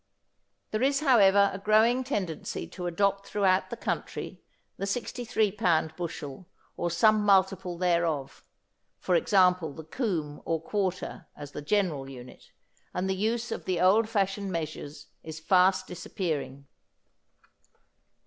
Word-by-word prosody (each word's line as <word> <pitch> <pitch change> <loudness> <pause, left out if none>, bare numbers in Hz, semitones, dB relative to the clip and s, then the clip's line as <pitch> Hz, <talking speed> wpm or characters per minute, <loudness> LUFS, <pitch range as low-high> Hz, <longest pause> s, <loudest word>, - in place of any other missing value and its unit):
There 215 - -1
is, 275 +2 +2
however, 200 -8 +5
a 195 - -5
growing 220 +5 +3
tendency 190 - -3
to 180 -2 -5
adopt 200 +3 0
throughout 195 -2 +2
the - - -6
country - - -4 0.4
the 195 - -3
63 225 -1 -1
pound 165 -6 +1
bushel 170 -1 -6 0.3
or 175 - -1
some 215 +5 +4
multiple 190 -3 +2
thereof, 170 -6 0 0.5
for 185 - -1
example 180 -3 +3
the 160 - -9
coomb 160 - -3
or 165 -1 -1
quarter, 185 -1 -3
as 145 -1 -8
the 150 - -6
general 150 -5 0
unit, 125 -2 -12 0.5
and 185 +1 -1
the 190 - +1
use 225 +4 -1
of - - -5
the 185 -2 -1
old 205 +5 +4
fashioned 195 -2 -1
measures 155 -3 -5 0.2
is 160 0 -8
fast 185 +3 +3
disappearing. 150 -6 -4
185 Hz, 130 wpm, -28 LUFS, 160-205 Hz, 0.5 s, however